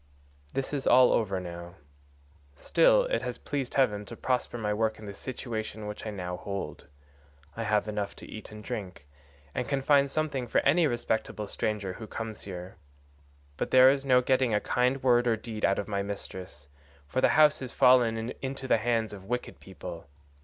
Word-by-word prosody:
This 135 +2 -2
is 140 -2 -2
all 125 +1 +7
over 100 -4 +1
now. 85 0 -8 0.8
Still - - +4
it - - -1
has - - -4
pleased 135 -4 -4
heaven 105 -7 +2
to - - -9
prosper 125 -2 -1
my 105 -2 -1
work 110 +1 0
in 110 - -11
the 100 - -6
situation 110 -2 -5
which 105 +1 -6
I - - -2
now 90 -3 -4
hold. 100 -6 -6 0.7
I 115 - -4
have 105 0 +1
enough 105 -1 -3
to - - -11
eat 110 - -9
and 105 0 -10
drink, 100 -11 -6 0.5
and 125 - -2
can 140 -1 0
find 140 -1 +4
something 140 -4 -2
for - - 0
any 160 +3 +4
respectable 110 -3 -2
stranger 100 -2 -2
who 110 +3 -9
comes 110 -1 -6
here; 90 -1 -8 0.8
but - - -2
there 130 +1 +8
is 140 0 -1
no 130 -2 +4
getting 130 -3 +2
a - - +3
kind 125 +4 0
word 120 -1 +4
or 115 -2 +2
deed 110 -1 -7
out 100 - +3
of 100 - -3
my 100 -2 -1
mistress, 95 -6 -6 0.4
for 130 - -1
the - - +5
house 150 -1 +6
has 130 -2 -6
fallen 120 -3 +4
into 135 0 -4
the 115 - +3
hands 115 -2 0
of 95 -2 -10
wicked 125 +3 -4
people. 90 -4 -9
115 Hz, 190 wpm, -29 LUFS, 100-130 Hz, 0.8 s, there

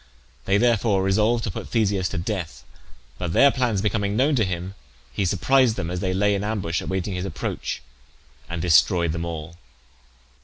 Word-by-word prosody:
They 100 - +3
therefore 110 -3 +2
resolved 110 +5 +2
to 105 - -2
put - - -7
Theseus 100 -5 +1
to 95 - -5
death; 85 - -4 0.6
but 85 -3 -3
their 140 +7 +6
plans 120 -7 0
becoming 100 -1 0
known 140 +6 +3
to 120 -5 +2
him, 90 0 -4 0.4
he 100 - -1
surprised 130 +5 +3
them 85 -4 -4
as 90 - -3
they 95 0 -1
lay 100 +2 +2
in 100 0 -1
ambush 100 -6 -2
awaiting 95 +1 -3
his 90 0 -3
approach, 80 -7 -4 0.7
and 85 -1 -4
destroyed 85 0 +4
them 85 +1 -3
all. 85 0 -6
95 Hz, 175 wpm, -23 LUFS, 85-110 Hz, 0.7 s, their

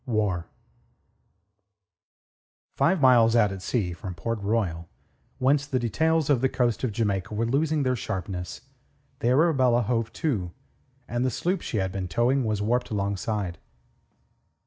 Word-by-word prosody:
WAR 105 -7 0 2.3
Five 190 - +2
miles 120 -4 +5
out 105 -4 +4
at 95 -1 -6
sea 95 -5 -1
from 90 +2 -7
Port 115 +5 -3
Royal, 100 -6 -1 0.5
whence 140 +2 +2
the 135 - 0
details 160 +6 +1
of 140 -5 +3
the 130 - +2
coast 120 -2 0
of 125 - 0
Jamaica 105 -2 -1
were 115 +2 0
losing 150 +4 +1
their 130 -1 +1
sharpness, 90 -5 -5 0.6
the - - -1
Arabella 130 -3 +3
hove 115 0 -1
to, 100 - -2 0.5
and 120 +2 -1
the 130 - +2
sloop 175 +9 -1
she 110 - -3
had 95 -2 0
been 95 -1 -4
towing 125 +9 +1
was 105 -2 -1
warped 120 +4 0
alongside. 100 -3 -2
115 Hz, 145 wpm, -26 LUFS, 100-130 Hz, 2.3 s, miles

